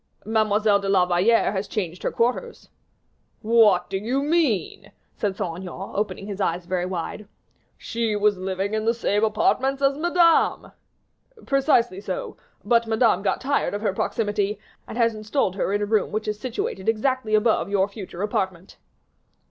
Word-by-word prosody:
"Mademoiselle 215 -1 +2
de 200 0 -3
la 190 -2 +4
Valliere 180 +6 +3
has 195 0 -3
changed 180 -4 -4
her - - -1
quarters." 250 - -2 0.7
"What 215 -5 +4
do 190 0 -3
you 250 +7 -1
mean?" 280 - 0 0.2
said 200 -2 -2
Saint 165 -2 -3
Aignan, 190 +1 -7
opening 195 -2 -3
his 200 -1 -5
eyes 175 -1 -1
very 180 0 -1
wide. 185 +3 -5 0.5
"She 230 -2 -2
was 205 0 +2
living 190 +2 -3
in 215 0 -1
the 230 +1 +2
same 210 -2 0
apartments 260 +5 +1
as 275 +1 +1
Madame." 340 0 +3 0.7
"Precisely 245 -8 +2
so; - - -5 0.3
but 235 -1 +3
Madame 220 -4 +2
got 195 - -1
tired 280 -5 0
of 205 - -5
her 200 - +1
proximity, 205 0 -1 0.3
and - - -7
has 230 -1 +3
installed 215 -1 -1
her 195 - -1
in 205 +1 0
a - - +1
room 215 0 +1
which 215 +1 -3
is 210 0 -2
situated 225 -5 -3
exactly 225 0 0
above 215 -3 +2
your 195 -1 +2
future 200 -3 -7
apartment." 190 -3 -3
210 Hz, 165 wpm, -24 LUFS, 195-230 Hz, 0.7 s, la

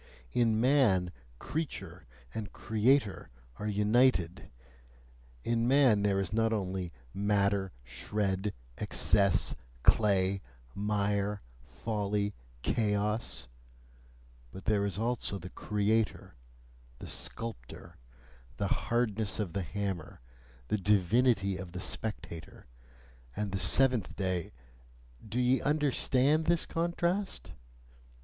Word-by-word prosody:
In 115 -2 +3
man 115 -9 +4 0.3
CREATURE 95 - -5 0.3
and 110 -3 -5
CREATOR 110 0 +1 0.3
are 105 - -4
united: 105 -3 +2 0.9
in 115 0 +1
man 130 -6 +5
there 100 -1 +2
is 95 +1 -2
not 115 0 +2
only 95 -4 -2 0.2
matter, 100 -1 +1
shred, 95 - -1 0.3
excess, 100 -3 +2 0.3
clay, 100 -2 +3 0.3
mire, 100 0 0 0.2
folly, 105 - -1 0.3
chaos; 105 - 0 1.0
but 95 - -10
there 105 -2 +2
is 100 -1 -2
also 115 -3 -1
the 90 0 -9
creator, 105 +1 0 0.6
the - - -9
sculptor, 115 - -6 0.6
the - - -1 0.2
hardness 110 -4 +1
of 100 -6 -2
the 100 - -1
hammer, 95 0 -4 0.5
the 105 - +1
divinity 100 +1 +3
of 90 -2 -8
the 90 - -4
spectator, 90 -5 -6 0.7
and 105 -2 -2
the 95 - -1
seventh 125 +2 +2
day 90 -3 -2 0.7
do 110 +3 -3
ye 125 +1 +3
understand 145 0 +2
this 170 0 +2
contrast? 170 - -1
105 Hz, 100 wpm, -31 LUFS, 95-115 Hz, 1.0 s, man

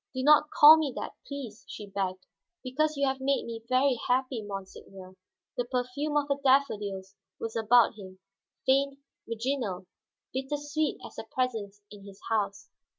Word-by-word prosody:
"Do 260 - -2
not 300 +1 +6
call 305 +2 +9
me 300 -4 -1
that, - - -4 0.2
please," 250 -7 -7
she 210 - -7
begged. 190 -2 -3 0.4
"Because 305 +4 0
you 280 - +2
have 265 0 -1
made 275 +1 +1
me 230 -1 -6
very 255 -1 +3
happy, 255 -1 +1
monseigneur." 195 -2 -9 0.4
The 245 - 0
perfume 255 +4 -2
of 290 -1 +1
her 280 -1 -1
daffodils 205 -8 +1 0.3
was 225 -1 -5
about 230 +1 +5
him, 190 -3 -11 0.5
faint, 275 +1 +2 0.3
virginal, 230 -5 -2 0.5
bitter 265 +3 -2
sweet 290 +1 -1
as - - -12
her 220 - -7
presence 220 -6 -2
in 205 -1 -12
his 195 -1 -13
house. 200 -2 -1
250 Hz, 155 wpm, -29 LUFS, 205-280 Hz, 0.5 s, call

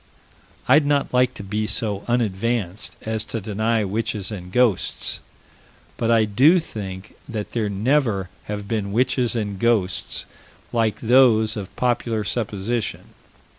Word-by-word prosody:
I'd 145 +4 +6
not 145 -2 +1
like 125 0 +3
to - - -7
be 105 +2 -2
so 105 -2 -2
unadvanced 115 -4 0
as 110 0 -2
to 115 - -3
deny 110 +2 0
witches 105 0 -2
and 90 -3 -7
ghosts, 120 -4 +1 0.8
but 115 - -1
I 115 -2 +5
do 130 - +5
think 100 - -6 0.2
that 110 -3 -4
there 110 -3 -1
never 105 -2 +1 0.2
have 105 -1 -5
been 100 -3 -2
witches 125 0 +2
and 105 -4 -2
ghosts 100 -6 0 0.5
like 115 -3 +1
those 115 -3 +5
of 100 -4 -7
popular 120 -3 0
supposition. 110 +1 -2
110 Hz, 135 wpm, -22 LUFS, 100-120 Hz, 0.8 s, I'd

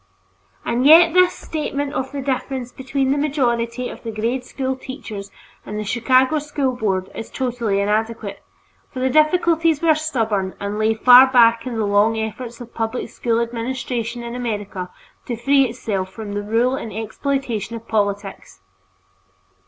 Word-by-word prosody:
And 245 +3 +1
yet 330 +1 +8
this 365 0 +5
statement 290 -2 -4
of 265 0 -3
the 280 -2 -5
difference 260 -2 -3
between 265 0 -1
the 285 - +1
majority 250 -4 0
of - - -9
the 230 - -6
grade 230 +4 -2
school 265 +1 -3
teachers 220 -7 -8 0.3
and 210 - -6
the 215 - -2
Chicago 255 +7 +2
School 285 -3 -2
Board 190 -5 -1
is 225 - -7
totally 240 -6 -1
inadequate, 210 0 -2 0.5
for - - -6
the 260 0 +1
difficulties 325 +1 +3
were 325 -1 +4
stubborn 225 -11 -1
and 205 +1 -3
lay 220 +1 +2
far 250 +3 +8
back 230 -1 +5
in 245 - -4
the 220 - 0
long 205 +2 +3
effort 225 +2 -5
of 240 -1 -11
public 225 +2 -3
school 230 -1 -1
administration 235 0 -3
in 235 0 -6
America 205 -6 -4 0.4
to 240 - -2
free 275 +3 +3
itself 200 -5 -3
from 210 -1 -7
the 205 - -2
rule 230 +5 +1
and 230 -4 -6
exploitation 230 +1 -3
of 230 0 -9
politics. 200 - -2
240 Hz, 160 wpm, -20 LUFS, 220-265 Hz, 0.5 s, yet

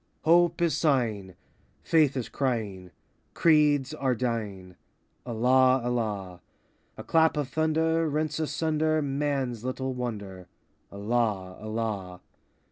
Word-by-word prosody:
Hope 170 +1 +4
is 170 - +2
sighing, 110 - 0 0.5
Faith 150 -4 +3
is 125 - -3
crying, 105 -9 -3 0.5
Creeds 150 -3 +3
are 135 -4 0
dying,— 105 -7 -4 0.5
Allah, 130 +3 +3
Allah! 105 -7 -3 0.6
A - - -7
clap 160 -1 +3
of 145 -3 -2
thunder 160 +1 +1
Rents 155 +2 -1
asunder 155 0 0
Man's 135 -4 -2
little 130 +1 -3
Wonder,— 100 -7 -6 0.4
Allah, 100 -3 -1
Allah! 110 -5 -4
130 Hz, 105 wpm, -27 LUFS, 105-155 Hz, 0.6 s, Hope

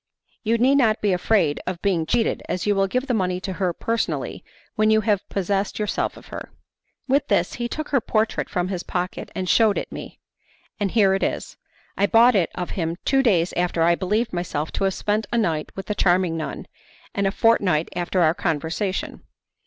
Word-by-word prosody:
You 230 +1 +1
need 265 +4 +4
not 220 -4 +3
be 205 -2 +1
afraid 180 -4 +2
of 185 -2 -3
being 175 -5 +1
cheated, 235 -1 +1
as 180 - -2
you 205 - +3
will 195 -1 +2
give 255 +7 -1
the 255 - -1
money 185 -4 0
to 190 -1 -4
her 180 -2 +2
personally 230 +6 -2 0.3
when 215 0 +2
you 220 0 +4
have 205 -2 0
possessed 195 +1 -1
yourself 210 -1 -1
of - - -15
her.' - - -7 0.6
With 280 +2 +2
this - - +1
he 240 - 0
took 310 +3 -4
her 275 -4 +2
portrait 220 +1 0
from 180 0 -1
his 185 -3 -3
pocket 180 0 -4
and 185 -1 -3
shewed 215 +1 +4
it - - -4
me; - - -8 0.6
and 205 -2 0
here 200 -2 +4
it 195 - 0
is. - - -2 0.4
I 200 - +3
bought 235 +3 +6
it 190 -6 +2
of 180 -1 -4
him 165 -2 -2
two 270 0 +3
days 185 -9 +2
after 175 -2 +1
I 170 +1 +5
believed 210 +6 -1
myself 170 -4 -3
to 195 - -1
have 190 - 0
spent 210 +1 -1
a 235 - +1
night 165 -9 0
with 195 - -6
the 210 - -2
charming 180 -3 +2
nun, 160 -1 -5 0.5
and 200 -1 +1
a - - +1
fortnight 195 -8 +2
after 180 +1 0
our 160 -1 +4
conversation. 175 +2 -2
195 Hz, 205 wpm, -23 LUFS, 180-220 Hz, 0.6 s, bought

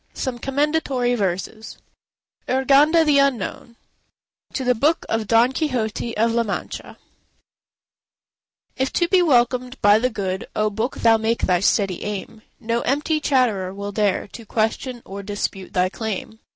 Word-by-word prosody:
SOME 255 -3 -3
COMMENDATORY 275 -2 0
VERSES 205 +1 -3 0.7
URGANDA 285 +5 +4
THE 290 -2 +4
UNKNOWN 255 -3 -1 0.8
To 265 - -2
the 250 0 +3
book 295 +8 +1
of 225 -2 -1
Don 230 +3 +4
Quixote 240 -6 -2
of 230 +2 +2
la 235 +1 +2
Mancha 210 -4 -5 1.8
If 265 0 -1
to 345 - +2
be 370 +1 +4
welcomed 250 -4 +2
by 205 +1 +6
the 250 +2 +1
good, 190 -4 -4
O 215 0 +1
Book! 220 +5 -2
thou 225 -1 +5
make 220 +1 -1
thy 180 -1 +3
steady 195 -1 +1
aim, 210 +2 -6 0.2
No 230 +1 -1
empty 295 +4 0
chatterer 225 -10 +1
will 200 0 -5
dare 205 -2 0
To 230 - -10
question 225 +3 -2
or 200 +1 -7
dispute 200 -1 -4
thy 180 0 +2
claim. 220 +1 -5
230 Hz, 145 wpm, -22 LUFS, 210-265 Hz, 1.8 s, by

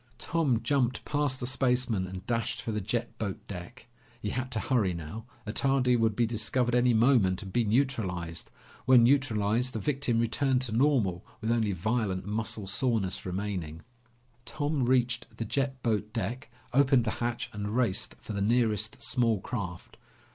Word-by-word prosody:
Tom 145 -9 +1
jumped 130 -4 +1
past 145 -3 0
the 120 - -3
spaceman 125 -6 +1
and 95 +1 -8
dashed 115 -1 -1
for 115 - -3
the 105 -1 -2
jet 115 +4 -2
boat 100 -4 -3
deck. 100 +7 -8 0.3
He 105 -3 -3
had 130 0 -3
to 110 - 0
hurry 110 -8 +1
now. 85 +8 -7 0.2
Attardi 125 +3 +2
would 115 -2 +2
be 120 - +3
discovered 120 +2 0
any 125 0 +4
moment 110 -5 +3
and 95 - -9
be 120 -1 +2
neutralized. 100 -9 -1 0.4
When 125 -2 +7
neutralized, 120 -2 +2
the 110 - -2
victim 135 0 0
returned 125 +3 +1
to 125 - -3
normal, 115 -8 +2 0.2
with 110 +1 -1
only 110 -4 +1
violent 95 0 -1
muscle 110 0 -3
soreness 100 -3 0
remaining. 90 -4 -4 0.6
Tom 145 +2 -1
reached 125 -1 +2
the 115 - -3
jet 135 +2 -2
boat 105 -2 0
deck, 115 +4 -3 0.2
opened 135 -2 +5
the 110 - 0
hatch, 120 0 -2
and 105 -1 -4
raced 120 -7 0
for - - -6
the 100 - -2
nearest 110 -1 +1
small 120 -4 +1
craft. 95 -5 -6
115 Hz, 160 wpm, -29 LUFS, 105-125 Hz, 0.6 s, When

